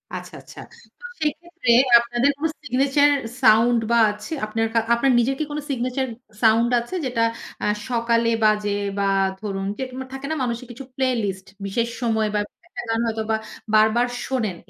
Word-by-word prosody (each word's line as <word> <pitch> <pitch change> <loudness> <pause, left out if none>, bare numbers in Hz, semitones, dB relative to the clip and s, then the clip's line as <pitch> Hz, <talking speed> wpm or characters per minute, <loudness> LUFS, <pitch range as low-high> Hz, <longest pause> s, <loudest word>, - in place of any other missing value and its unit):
আচ্ছা, - - -8
আচ্ছা। - - -14 0.4
তো 485 - -12 0.2
সেক্ষেত্রে 305 -4 -1 0.3
আপনাদের 240 +3 +1
কোন 315 - -3 0.2
signature 280 +2 +3 0.3
sound 235 0 +5
বা 235 - +4
আছে 210 +9 -10
আপনার 225 +1 -1
কা 230 - +4
আপনার 260 +3 +2
নিজের 265 +3 +1
কি - - +1
কোন 295 - -3
signature 255 +1 -1 0.3
sound 230 +1 +4
আছে, 240 +11 -6
যেটা 245 -3 -1 0.4
আ - - +1 0.2
সকালে 235 -1 +1
বাজে, 210 -1 +2 0.3
বা 200 - 0 0.4
ধরুন 195 -2 -4
যে - - -3
তোমার 260 0 -7
থাকে 270 +1 -6
না, - - 0
মানুষের 235 +1 -3
কিছু 240 +3 -9
প্লেলিস্ট 220 -8 -1 0.2
বিশেষ 230 +4 -1
সময়, 220 -2 +1
বা - - +1
একটা 275 - -18 0.2
গান 225 - +1
হয়তোবা 220 0 -1 0.4
বারবার 220 +3 +4 0.2
শোনেন 225 -8 -2
235 Hz, 165 wpm, -22 LUFS, 220-265 Hz, 0.4 s, sound